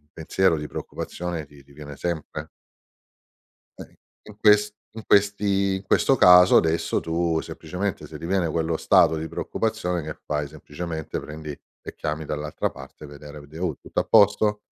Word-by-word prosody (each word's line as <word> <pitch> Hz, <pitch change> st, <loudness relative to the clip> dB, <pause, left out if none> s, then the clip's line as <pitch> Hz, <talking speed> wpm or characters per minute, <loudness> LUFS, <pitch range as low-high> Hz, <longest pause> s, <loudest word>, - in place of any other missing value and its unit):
un 75 Hz, -, -37 dB
pensiero 85 Hz, +2 st, +1 dB
di 75 Hz, -1 st, -6 dB
preoccupazione 85 Hz, -3 st, -5 dB
ti 70 Hz, -1 st, -18 dB
ti 70 Hz, -, -20 dB
viene 70 Hz, 0 st, -10 dB
sempre. 80 Hz, -2 st, -4 dB, 1.3 s
Eh, -, -, -6 dB
i -, -, -26 dB, 0.3 s
in 105 Hz, -, -13 dB
ques 105 Hz, -1 st, +5 dB, 0.2 s
in 110 Hz, 0 st, -8 dB
questi 100 Hz, -1 st, +2 dB
in 95 Hz, -, -6 dB
questo 135 Hz, -, +3 dB
caso, 90 Hz, -5 st, +7 dB
adesso, 80 Hz, +1 st, +1 dB
tu 80 Hz, 0 st, 0 dB
semplicemente 90 Hz, +4 st, -5 dB
se -, -, -9 dB
riviene 85 Hz, 0 st, -1 dB
quello 80 Hz, 0 st, -1 dB
stato 80 Hz, -, +4 dB
di 80 Hz, +1 st, -4 dB
preoccupazione, 110 Hz, -6 st, -2 dB
che 75 Hz, 0 st, -7 dB
fai, 75 Hz, -1 st, -2 dB
semplicemente 80 Hz, +2 st, -6 dB
prendi 75 Hz, 0 st, -8 dB
e 70 Hz, -, -12 dB
chiami 75 Hz, +1 st, -4 dB
dall'altra 75 Hz, 0 st, -3 dB
parte, 75 Hz, -, -12 dB
vedere 75 Hz, +1 st, -11 dB
vede: 75 Hz, +3 st, -12 dB
"Oh 85 Hz, -5 st, -1 dB
tutto -, -, -4 dB
a -, -, +1 dB
posto?" 105 Hz, +1 st, +4 dB
80 Hz, 165 wpm, -24 LUFS, 75-95 Hz, 1.3 s, caso